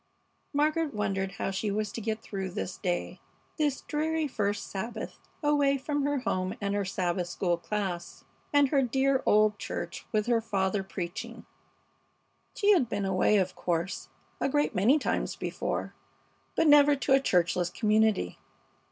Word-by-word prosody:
Margaret 305 0 +1
wondered 195 -2 -1
how 195 - -2
she 200 +2 -2
was 210 0 -1
to 230 - -5
get 220 0 -3
through 195 -2 -4
this 180 0 -4
day, 180 -3 -2 0.4
this 290 -3 +1
dreary 315 +1 -1
first 205 -5 -1
Sabbath 210 +5 -5 0.2
away 285 -2 +3
from 290 +2 -2
her 285 -2 0
home 185 -5 -1
and 200 -1 -1
her 205 0 0
Sabbath 180 -2 -1
school 175 0 0
class, 180 -1 -4 0.3
and 285 -2 +4
her 275 -1 +3
dear 265 +2 +2
old 210 0 +4
church - - -5
with 215 -1 +1 0.2
father 195 -2 0
preaching. 180 -2 -6 1.1
She 415 -1 +4
had 285 - +4
been 205 -2 -1
away, 190 +2 +3
of 185 -2 0
course, 170 +2 -2 0.3
a - - +1
great 290 -1 +1
many 220 +9 +4
times - - -1
before, - - -3 0.6
but - - +3
never 290 0 +7
to 275 0 +1
a 270 - +7
churchless 180 -6 +1
community. 215 - +1
210 Hz, 150 wpm, -29 LUFS, 190-280 Hz, 1.1 s, never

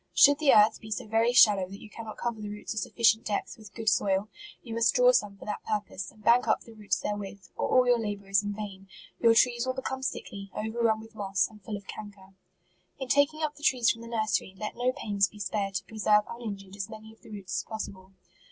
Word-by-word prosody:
Should 285 0 +7
the 300 -3 +5
earth 215 +1 +5
be 220 - -10
so 215 - -3
very 225 +2 +2
shallow 205 -6 +5
that 195 +1 -9
you - - -11
cannot 220 0 -9
cover 235 -2 -3
the 210 - -5
roots 210 +1 -6
a - - -10
sufficient 225 +2 +2
depth 205 -1 -3
with 215 -4 -15
good 225 -1 -7
soil, 195 +1 +2 0.3
you 230 - -7
must 230 0 +2
draw - - +6
some 205 - 0
for - - -12
that 210 - -4
purpose, 205 -3 -3
and 215 -1 -19
bank 235 +3 +4
up - - +2
the 230 - -14
roots 210 -2 -2
therewith, 200 -3 -5
or - - -2
all 255 -1 +5
your 245 -1 +4
labour 205 -3 -4
is 195 0 +4
in 205 -1 -4
vain; 195 -2 -7 0.3
your 230 -1 +5
trees 240 +1 +3
will 255 - -1
become 265 0 -4
sickly, 200 -6 -5
over - - -3
56 - - -8
ilARCH. - - +3
run 220 -1 +1
with 225 +1 -14
moss, 195 -3 0
and 210 -1 -16
full 210 +1 -5
of 200 - -13
canker. 200 -2 -10 0.6
In 265 -2 -6
taking 285 +3 +2
up 300 -1 -1
the - - -15
trees 245 -5 +4
from 230 - -7
the 230 - -9
nursery, 215 -4 -1
let 210 +2 -5
no 250 +1 +1
pains 205 -6 0
be 210 - -16
spared 200 -1 -2
to - - -1
preserve 210 -1 +2
uninjured 200 -5 -7
as 200 +1 -5
many 220 0 -11
of 225 - -25
the - - -15
roots 200 -3 -4
as - - -4
possible. 195 -3 -7
215 Hz, 250 wpm, -28 LUFS, 200-230 Hz, 0.6 s, Should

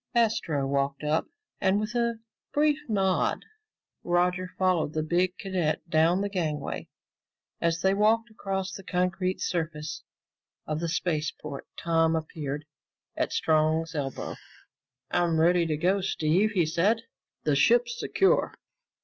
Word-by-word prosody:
Astro 200 -11 +2
walked 140 +1 -1
up, 150 +2 +1 0.3
and 195 +1 +2
with 215 +1 -2
a 235 -1 +1 0.4
brief 295 0 +3
nod 190 -3 +1 0.6
Roger 180 +1 +1
followed 180 -5 +1
the 155 - 0
big 180 +3 +1
cadet 180 -4 -1
down 165 +4 +3
the 200 - 0
gangway. 155 -7 -3 0.7
As 165 0 +1
they 190 0 +3
walked 220 +3 +2
across 195 -2 -3
the - - -7
concrete 185 +1 0
surface 155 -3 -3 0.6
of 155 0 -2
the 170 0 -2
spaceport, 155 -4 -3
Tom 165 -1 +2
appeared 150 -2 -4 0.5
at - - -1
Strong's 160 +1 +2
elbow. 140 -3 -4 0.7
"I'm 170 -2 +2
ready 170 +1 +4
to 155 -2 0
go, 185 +5 +2
Steve," 190 +3 +1
he 175 -3 +4
said. 195 +9 +1 0.4
"The - - +2
ship's 475 0 +3
secure." 390 - +2
175 Hz, 130 wpm, -27 LUFS, 155-195 Hz, 0.7 s, ready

